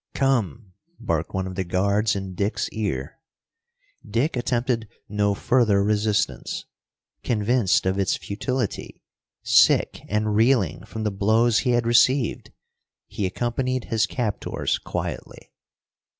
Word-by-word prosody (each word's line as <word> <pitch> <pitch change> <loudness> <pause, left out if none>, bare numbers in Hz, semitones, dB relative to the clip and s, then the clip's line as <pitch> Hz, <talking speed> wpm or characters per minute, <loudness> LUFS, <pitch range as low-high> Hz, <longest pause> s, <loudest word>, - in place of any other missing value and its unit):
"Come!" 120 - 0 0.3
barked 80 -1 -2
one 95 0 -2
of 95 - -6
the 95 - -2
guards 100 +4 +1
in 95 -1 -5
Dick's 100 +3 -1
ear. 95 - -4 0.8
Dick 120 +9 -1
attempted 120 -2 -1 0.2
no 105 0 0
further 110 -4 +2
resistance. 105 0 -1 0.6
Convinced 110 -3 +1
of 95 +1 0
its 95 - +1
futility, 120 +2 -4 0.4
sick - - +4
and 105 +1 0
reeling 110 - +2
from 110 0 -5
the 105 - 0
blows 110 +4 +3
he 125 -3 +1
had 120 -1 +1
received, 120 +2 +2 0.5
he 100 - -3
accompanied 125 +5 -2
his 110 -1 +2
captors 110 -4 -2
quietly. - - -6
105 Hz, 120 wpm, -24 LUFS, 100-120 Hz, 0.8 s, sick